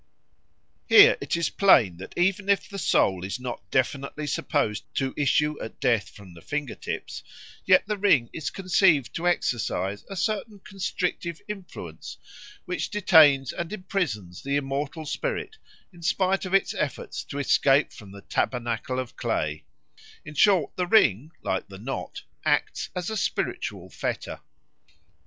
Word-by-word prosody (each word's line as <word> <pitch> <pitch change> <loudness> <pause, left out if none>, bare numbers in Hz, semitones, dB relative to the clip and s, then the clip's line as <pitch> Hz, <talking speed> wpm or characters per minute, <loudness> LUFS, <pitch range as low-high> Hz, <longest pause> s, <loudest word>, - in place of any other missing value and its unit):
Here 430 +4 +9
it - - -1
is 170 - 0
plain 120 - +5
that 95 - -10
even 190 +3 +1
if 200 - +2
the 200 - -7
soul 95 - +2
is 100 +6 -4
not 125 -1 -5
definitely 140 +4 -1
supposed 145 -7 -1
to 135 -1 -1
issue 150 +1 +1
at 110 - -8
death 115 -6 +1
from 100 -3 -14
the 85 - -14
finger 145 - -3
tips, - - -6 0.4
yet - - +5
the 210 -1 -3
ring 155 -12 +4
is 160 - -3
conceived 180 -7 +2
to 170 +1 -2
exercise 105 - -1
a 195 - -6
certain 215 +2 -2
constrictive 185 -3 -3
influence 180 - -8 0.5
which 180 - -3
detains 155 - +5
and 170 0 -4
imprisons 175 - -3
the 140 +1 -2
immortal 145 +3 -2
spirit 440 - -3 0.4
in 175 - -15
spite 190 +3 +1
of 185 - -5
its 195 - +2
efforts 150 -2 -3
to 140 - -7
escape 140 0 +3
from 100 -3 -12
the 100 0 -11
tabernacle 120 +2 -2
of 130 -2 -4
clay; 75 0 -2 0.6
in 150 - -8
short 175 -2 +3
the 180 -1 0
ring, 150 - +4
like - - -2
the - - -11
knot, - - -6 0.2
acts - - 0
as 180 +3 -3
a - - -2
spiritual - - -2
fetter. - - -4
150 Hz, 150 wpm, -26 LUFS, 120-190 Hz, 0.6 s, Here